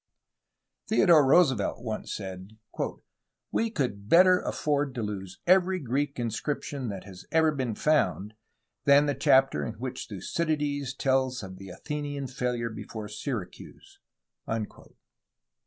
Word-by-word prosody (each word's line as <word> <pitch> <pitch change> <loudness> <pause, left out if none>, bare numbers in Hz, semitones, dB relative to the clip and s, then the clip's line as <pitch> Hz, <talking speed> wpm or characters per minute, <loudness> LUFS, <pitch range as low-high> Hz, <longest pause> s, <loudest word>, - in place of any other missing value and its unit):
Theodore 170 -8 +6
Roosevelt 130 - +3
once 110 -3 -4
said: 95 +1 -8 0.9
"We 225 - +1
could 120 - -3
better 180 +1 +6
afford 145 -3 -1
to 120 - -2
lose 95 -3 -5
every 185 +1 +4
Greek 140 0 -2
inscription 125 +2 -3
that 95 -2 -6
has 95 -2 -12
ever 160 -1 +4
been 130 -6 -2
found 140 -9 +1 0.5
than 140 +1 +6
the 145 - +1
chapter 130 - +3
in 70 - -4
which - - -5
Thucydides 145 -4 -2
tells 130 -3 +1
of 95 -1 -8
the 95 -1 -9
Athenian 145 - -4
failure 125 -2 -2
before. 110 -1 -7
Syracuse." 105 -2 -7
130 Hz, 120 wpm, -28 LUFS, 105-150 Hz, 0.9 s, Theodore